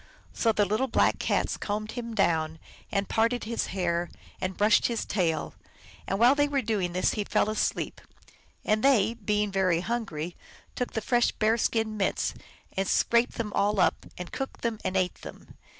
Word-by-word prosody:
So 230 - +2
the 210 -1 +2
little 215 +7 0
Black - - +2
Cats - - 0
combed 215 +1 -3
him 235 -2 -5
down, 160 -5 +1 0.3
and 200 -1 0
parted 230 +2 +1
his 230 +1 -2
hair, 175 -2 -1 0.3
and 185 0 -3
brushed 210 +1 +4
his 235 -2 -2
tail, 175 -5 -1 0.5
and 195 - 0
while 240 +5 +6
they 290 0 +2
were 280 -2 0
doing 200 -6 -1
this 180 - +1
he 210 - -1
fell 210 +1 +1
asleep; 215 - -2 0.6
and 215 0 +1
they, 230 -6 +4
being 210 -2 -1
very 185 -3 +2
hungry, 180 -7 -3 0.4
took 250 - -3
the 220 - -1
fresh 240 +2 +2
bear 220 +1 +2
skin 220 -1 0
mitts, 195 - 0 0.4
and 195 0 0
scraped 235 +1 +2
them 210 -3 -4
all 205 0 +1
up, - - +2
and 180 -1 -7
cooked 270 -2 -5
and 225 -2 -1 0.2
ate 185 -1 -1
them. - - -11
210 Hz, 175 wpm, -28 LUFS, 190-230 Hz, 0.6 s, while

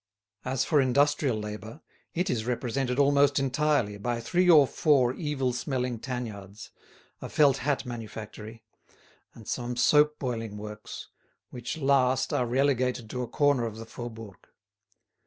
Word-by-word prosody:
As 130 0 -1
for 150 -3 +3
industrial 140 -1 +2
labour, 105 +5 -7 0.3
it 180 +2 0
is 115 -1 -2
represented 125 +1 -1
almost 140 0 +4
entirely 135 -6 +1
by 120 +2 -2
three 175 +10 +1
or 155 -5 +8
four 130 -3 +2
evil 135 -5 -2
smelling 125 -1 -2
tanyards, 110 -6 -7 0.5
a - - -6
felt 145 -3 +4
hat 140 +1 -1
manufactory, 110 -1 -8 0.7
and 110 - -13
some 125 0 -3
soap 150 +5 +4
boiling 115 -5 -4
works, 105 0 -8 0.4
which 125 +4 -5
last 135 -3 +2
are 125 - +1
relegated 125 -3 0
to 125 - -3
a 125 - -3
corner 140 -1 +2
of 110 - -7
the 115 - -8
Faubourg. 115 -4 -9
125 Hz, 140 wpm, -28 LUFS, 115-140 Hz, 0.7 s, or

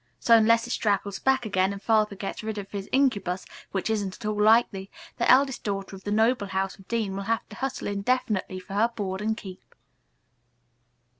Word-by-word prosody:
So, 230 - +5
unless 230 +1 +4
it 240 - -6
straggles 200 -3 0
back 265 -2 +2
again 190 -2 +1
and 200 - -6
Father 215 -1 +2
gets 195 0 -5
rid 220 -1 -4
of 200 -1 -7
his 200 -1 -5
incubus, 200 -9 +1 0.3
which 190 -2 -2
isn't 205 -4 -1
at 230 - -11
all 210 -1 -1
likely, 210 -3 +3 0.3
the 235 - +1
eldest 270 +1 +4
daughter 195 -1 -3
of 190 - -13
the 205 - -2
noble 220 0 +2
house 190 0 -2
of 195 - -17
Dean 220 -5 -1
will 195 0 -4
have 230 -1 0
to 210 - -10
hustle 265 -1 -3
indefinitely 200 -2 -1
for 185 - -11
her 215 +3 +3
board 200 -5 -4
and 220 +1 -1
keep. 190 -5 -11
210 Hz, 200 wpm, -26 LUFS, 195-230 Hz, 0.3 s, So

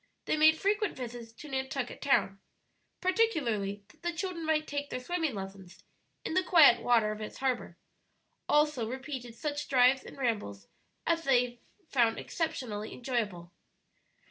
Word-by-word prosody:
They - - +1
made 315 +1 +6
frequent 415 +2 0
visits 240 -2 -7
to 300 - -11
Nantucket 265 -2 -3
Town, 195 -8 +2 0.6
particularly 260 - +1
that - - -22
the 345 0 -1
children 340 -1 -4
might 310 -1 +2
take 285 -1 -4
their 255 - -3
swimming 320 -1 -2
lessons 195 -2 -9 0.4
in - - -2
the 370 - +4
quiet 315 -10 +6
water 230 -3 +3
of 215 0 -6
its 215 - -6
harbor; 260 -2 -2 0.7
also 295 -6 +3
repeated 260 -2 -6
such 295 +3 -3
drives 260 0 +5
and - - -11
rambles 205 - -2 0.4
as 330 0 +1
they 245 -3 +2 0.3
found 235 -5 +2
exceptionably 225 -10 -3
enjoyable. 215 -9 -3
260 Hz, 145 wpm, -30 LUFS, 225-310 Hz, 0.7 s, made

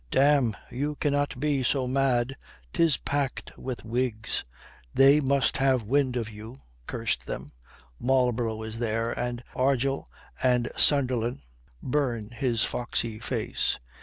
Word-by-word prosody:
"Damme, 135 - +3
you 145 +4 -2
cannot 145 -2 0
be 145 -1 +1
so 130 +1 +1
mad! 130 -1 +1 0.4
'Tis 165 -5 +3
packed 140 -2 -3
with 130 -3 -6
Whigs. 115 -1 -1 0.5
They 140 +2 +7
must 140 -1 +2
have 135 -3 +2
wind 130 +3 +1
of 115 -2 -2
you, 110 +3 -10 0.3
curse - - 0
them. 70 +3 -7 0.5
Marlborough 120 -3 +1
is 110 +1 -6
there, 115 0 0
and 120 0 -3
Argyll 135 +1 +1 0.3
and 125 -2 +2
Sunderland, 125 - +2 0.4
burn 125 -6 -1
his 120 -1 +1
foxy 115 -2 -1
face. 110 - -1
125 Hz, 125 wpm, -27 LUFS, 115-135 Hz, 0.5 s, They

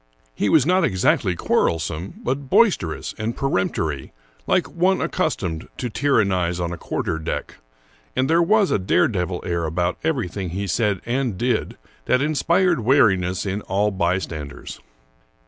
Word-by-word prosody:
He 100 - 0
was 150 -5 +5
not 185 +2 +3
exactly 95 - +2
quarrelsome, 80 +2 -1
but 135 +1 -2
boisterous 115 - +2
and 110 +2 -3
peremptory, 85 - -1 0.3
like - - +2
one 185 +3 +1
accustomed 95 - -2
to 125 -3 -4
tyrannize 95 -10 +1
on 85 0 -2
a - - -6
quar - - -3
ter 80 - -2
deck; 80 - -4 0.6
and 130 +1 +1
there 165 +3 +4
was 205 +3 +3
a - - +2
dare 90 -1 +3
devil 90 -4 -2
^ - - -9
air 85 -1 -1
about 85 +3 -1
everything 105 - -2
he 95 +4 -3
said 100 -1 0
and 120 -4 -1
did 125 +3 -1 0.3
that 125 - +3
inspired 165 +4 +2
wariness 100 -8 +2
in 100 +1 -2
all 105 +2 0
bystanders. 85 -5 -3
100 Hz, 150 wpm, -22 LUFS, 90-135 Hz, 0.6 s, was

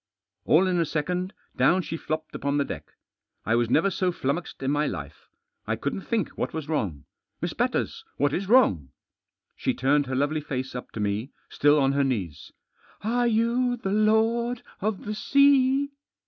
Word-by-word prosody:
All 165 +5 +5
in 180 -2 +1
a 165 - +2
second 180 +5 -2 0.2
down 170 +8 +3
she 165 - -4
flopped 155 -1 -4
upon 140 +1 -1
the 140 - +1
deck. - - -8 0.5
I 115 - +1
was 120 0 +2
never 165 +10 +3
so 185 0 0
flummoxed 145 -1 -3
in 135 - +1
my 150 +1 +1
life. 80 - -7 0.4
I - - 0
couldn't - - -3
think 220 -2 -1
what - - -4
was 155 -2 -4
wrong. 100 - -2 0.2
" - - -56
Miss - - -2
Batters! - - -1
What 145 0 +1
is 190 +4 -2
wrong? 155 - +4 0.3
" - - -55
She - - -1
turned 140 +2 +2
her 130 - -2
lovely 145 +3 0
face 130 -2 -4
up 125 - -6
to - - -6
me 105 +4 -1
— - - -39
still 145 +1 +4
on 135 -2 +3
her 140 0 +2
knees. 100 - -3 0.3
" - - -30
Are 240 +3 +1
you 235 +2 +1
the 195 -4 -2
lord 225 +3 +2 0.2
of 210 0 -2
the 210 - -2
sea 280 +3 +4
160 Hz, 190 wpm, -26 LUFS, 135-215 Hz, 0.5 s, All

